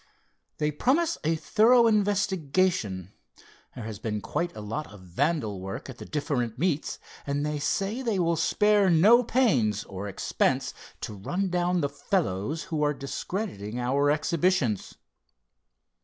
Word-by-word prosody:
"They 150 Hz, 0 st, 0 dB
promise 300 Hz, -, +1 dB
a 160 Hz, +2 st, +2 dB
thorough 230 Hz, +8 st, +4 dB
investigation. 185 Hz, -, +1 dB, 0.6 s
There 125 Hz, -, -6 dB
has 110 Hz, -2 st, -6 dB
been 105 Hz, -2 st, -2 dB
quite 175 Hz, +10 st, -3 dB
a -, -, -7 dB
lot 110 Hz, +9 st, -5 dB
of 100 Hz, -2 st, -13 dB
vandal 105 Hz, -, -1 dB
work 95 Hz, +7 st, -6 dB
at 125 Hz, -, -14 dB
the -, -, -8 dB
different 130 Hz, -6 st, -2 dB
meets, 155 Hz, 0 st, -1 dB, 0.3 s
and 140 Hz, +1 st, -1 dB
they 150 Hz, 0 st, -2 dB
say 200 Hz, -, -1 dB
they 230 Hz, -6 st, 0 dB
will 170 Hz, -2 st, +2 dB
spare 205 Hz, +4 st, +3 dB
no 210 Hz, +9 st, +6 dB
pains, 130 Hz, -, +2 dB
or 100 Hz, +1 st, -7 dB
expense, 100 Hz, -, 0 dB, 0.3 s
to -, -, -5 dB
run 175 Hz, -, -2 dB
down 180 Hz, 0 st, +1 dB
the 140 Hz, -, +1 dB
fellows 145 Hz, -, -1 dB
who 160 Hz, -5 st, -3 dB
are 150 Hz, 0 st, +2 dB
discrediting 135 Hz, -, -4 dB
our 140 Hz, +4 st, +2 dB
exhibitions. 155 Hz, -, +1 dB
150 Hz, 140 wpm, -27 LUFS, 115-190 Hz, 0.6 s, no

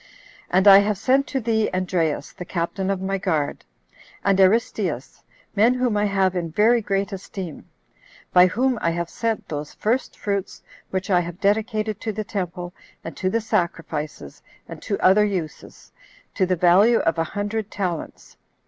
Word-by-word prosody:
And 190 Hz, +3 st, +3 dB
I 195 Hz, 0 st, +10 dB
have 205 Hz, 0 st, 0 dB
sent 265 Hz, +7 st, +2 dB
to 270 Hz, -, -2 dB
thee 220 Hz, -2 st, 0 dB
Andreas, 180 Hz, -5 st, -1 dB
the -, -, -8 dB
captain 180 Hz, +2 st, -3 dB
of 190 Hz, -1 st, -1 dB
my 195 Hz, 0 st, -1 dB
guard, 160 Hz, -6 st, -1 dB, 0.6 s
and 195 Hz, -1 st, +3 dB
Aristeus, 205 Hz, +5 st, +1 dB, 0.3 s
men 225 Hz, +5 st, +4 dB
whom 250 Hz, -3 st, 0 dB
I 205 Hz, 0 st, +2 dB
have 195 Hz, -2 st, +1 dB
in 170 Hz, -2 st, -2 dB
very 220 Hz, +8 st, +3 dB
great 200 Hz, 0 st, -1 dB
esteem; 190 Hz, -3 st, -7 dB, 0.6 s
by 180 Hz, 0 st, +7 dB
whom 250 Hz, +4 st, 0 dB
I 170 Hz, -, +1 dB
have 170 Hz, 0 st, -3 dB
sent 225 Hz, -2 st, -2 dB
those 150 Hz, -1 st, -6 dB
first 240 Hz, +5 st, -1 dB
fruits 200 Hz, -2 st, -3 dB, 0.3 s
which 190 Hz, +2 st, -3 dB
I 180 Hz, -, +5 dB
have 175 Hz, +1 st, -5 dB
dedicated 215 Hz, +1 st, 0 dB
to 220 Hz, -, -2 dB
the 215 Hz, +1 st, -4 dB
temple, 180 Hz, -3 st, -5 dB, 0.3 s
and -, -, -7 dB
to 185 Hz, -, -1 dB
the 230 Hz, +4 st, 0 dB
sacrifices, 160 Hz, -, -3 dB, 0.3 s
and -, -, -9 dB
to 200 Hz, -, -2 dB
other 195 Hz, +3 st, +5 dB
uses, 185 Hz, -7 st, -5 dB, 0.4 s
to 190 Hz, -3 st, +1 dB
the 185 Hz, -, +1 dB
value 185 Hz, +7 st, +5 dB
of 165 Hz, -4 st, 0 dB
a -, -, +3 dB
hundred 205 Hz, +1 st, -2 dB
talents. 180 Hz, -6 st, -5 dB
195 Hz, 165 wpm, -23 LUFS, 180-215 Hz, 0.6 s, I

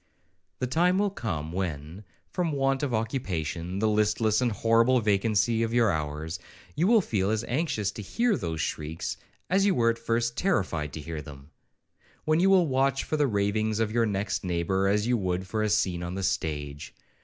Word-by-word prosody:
The 125 Hz, -, -1 dB
time 175 Hz, +8 st, +2 dB
will 205 Hz, 0 st, +1 dB
come, 80 Hz, -, -4 dB
when, 85 Hz, 0 st, -4 dB, 0.3 s
from 180 Hz, -2 st, -1 dB
the 150 Hz, -, -2 dB
want 135 Hz, 0 st, +1 dB
of 145 Hz, -3 st, -1 dB
occupation, 90 Hz, -, -2 dB
the 110 Hz, +2 st, +1 dB
listless 105 Hz, +1 st, +2 dB
and 125 Hz, -2 st, +2 dB
horrible 115 Hz, +4 st, +3 dB
vacancy 110 Hz, +1 st, +2 dB
of 115 Hz, +1 st, -1 dB
your 115 Hz, -4 st, +4 dB
hours, 80 Hz, +2 st, -3 dB, 0.4 s
you 165 Hz, +5 st, +2 dB
will 225 Hz, -1 st, +5 dB
feel 100 Hz, -, -1 dB
as 110 Hz, +1 st, 0 dB
anxious 120 Hz, -, -1 dB
to 110 Hz, -, -7 dB
hear 230 Hz, -, +1 dB
those 80 Hz, -, -3 dB
shrieks, 80 Hz, +2 st, -3 dB, 0.3 s
as 195 Hz, +2 st, +2 dB
you 200 Hz, -2 st, +3 dB
were 115 Hz, -1 st, +3 dB
at 115 Hz, -, -7 dB
first 115 Hz, +1 st, 0 dB
terrified 85 Hz, -, 0 dB
to 80 Hz, -, -6 dB
hear 80 Hz, 0 st, -5 dB
them,—when 75 Hz, -, -6 dB
you 190 Hz, +2 st, +4 dB
will 190 Hz, -3 st, +5 dB
watch 135 Hz, -1 st, +1 dB
for -, -, -2 dB
the 150 Hz, -2 st, +2 dB
ravings 105 Hz, 0 st, 0 dB
of 110 Hz, -1 st, 0 dB
your 115 Hz, 0 st, +2 dB
next 100 Hz, 0 st, -2 dB
neighbour, 90 Hz, +2 st, 0 dB
as 105 Hz, +2 st, +2 dB
you 120 Hz, 0 st, +2 dB
would 95 Hz, -2 st, -2 dB
for 110 Hz, +3 st, -2 dB
a 110 Hz, -, +1 dB
scene 90 Hz, -2 st, +1 dB
on 85 Hz, +1 st, -4 dB
the 95 Hz, -, -3 dB
stage. 75 Hz, -6 st, -3 dB
110 Hz, 190 wpm, -27 LUFS, 90-125 Hz, 0.4 s, will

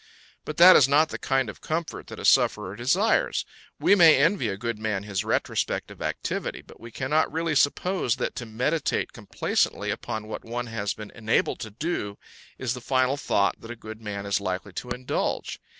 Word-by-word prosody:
But 150 Hz, -, -6 dB
that 180 Hz, +2 st, +10 dB
is 135 Hz, -, +7 dB
not 150 Hz, +3 st, +4 dB
the -, -, -6 dB
kind 135 Hz, -2 st, +1 dB
of 105 Hz, -, -9 dB
comfort 160 Hz, +1 st, -4 dB
that -, -, -9 dB
a -, -, -6 dB
sufferer 95 Hz, -, +3 dB
desires; 185 Hz, -, +1 dB, 0.3 s
we -, -, +4 dB
may 165 Hz, -7 st, +7 dB
envy 160 Hz, -, +2 dB
a 95 Hz, -2 st, -3 dB
good 115 Hz, +1 st, -3 dB
man 105 Hz, -3 st, -2 dB
his 100 Hz, -2 st, -2 dB
retrospect -, -, -1 dB
of -, -, -13 dB
activity, -, -, -3 dB
but -, -, -16 dB
we 115 Hz, -, -10 dB
cannot 135 Hz, +7 st, 0 dB
really 165 Hz, +1 st, -1 dB
suppose 145 Hz, -1 st, +1 dB
that 125 Hz, -, -3 dB
to 120 Hz, -, -5 dB
meditate 125 Hz, +9 st, -1 dB
complacently -, -, -1 dB
upon 110 Hz, 0 st, -5 dB
what 110 Hz, -, -6 dB
one 120 Hz, +2 st, -4 dB
has 110 Hz, -3 st, -3 dB
been 105 Hz, -1 st, -9 dB
enabled 110 Hz, -1 st, 0 dB
to 115 Hz, -3 st, -6 dB
do 105 Hz, -4 st, -3 dB, 0.4 s
is 130 Hz, -3 st, -2 dB
the 125 Hz, -, -7 dB
final 130 Hz, +2 st, +1 dB
thought 100 Hz, -8 st, 0 dB
that 115 Hz, -, -11 dB
a 120 Hz, -, -5 dB
good 110 Hz, -1 st, -10 dB
man 100 Hz, -2 st, -5 dB
is 100 Hz, 0 st, 0 dB
likely 95 Hz, 0 st, -4 dB
to 125 Hz, -, -6 dB
indulge. 125 Hz, +1 st, -2 dB
120 Hz, 195 wpm, -26 LUFS, 110-150 Hz, 0.4 s, that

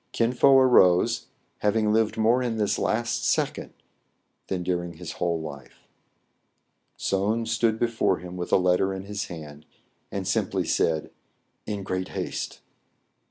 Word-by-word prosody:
Kin 115 Hz, +1 st, +1 dB
Fo 135 Hz, +2 st, +6 dB
arose, 95 Hz, -9 st, +4 dB, 0.3 s
having 105 Hz, 0 st, +2 dB
lived 110 Hz, 0 st, +1 dB
more 115 Hz, +3 st, +3 dB
in 120 Hz, -3 st, -2 dB
this 105 Hz, -2 st, 0 dB
last 115 Hz, +1 st, 0 dB
second -, -, 0 dB, 0.8 s
than 90 Hz, -2 st, -2 dB
during 85 Hz, -1 st, -2 dB
his 85 Hz, 0 st, -8 dB
whole 85 Hz, -2 st, -1 dB
life. 70 Hz, -5 st, -10 dB, 1.1 s
Soun 105 Hz, +4 st, 0 dB
stood 110 Hz, 0 st, +1 dB
before 115 Hz, -5 st, +1 dB
him, 90 Hz, +2 st, -9 dB
with 90 Hz, -1 st, -5 dB
a -, -, +6 dB
letter 90 Hz, +1 st, +2 dB
in 95 Hz, -, -6 dB
his 105 Hz, +2 st, -4 dB
hand, 75 Hz, -5 st, -9 dB, 0.5 s
and 95 Hz, -1 st, -4 dB
simply 95 Hz, -3 st, 0 dB
said, 80 Hz, -2 st, 0 dB, 0.6 s
"In 105 Hz, -2 st, -3 dB
great 95 Hz, -1 st, -3 dB
haste." -, -, -5 dB
95 Hz, 140 wpm, -26 LUFS, 90-110 Hz, 1.1 s, Fo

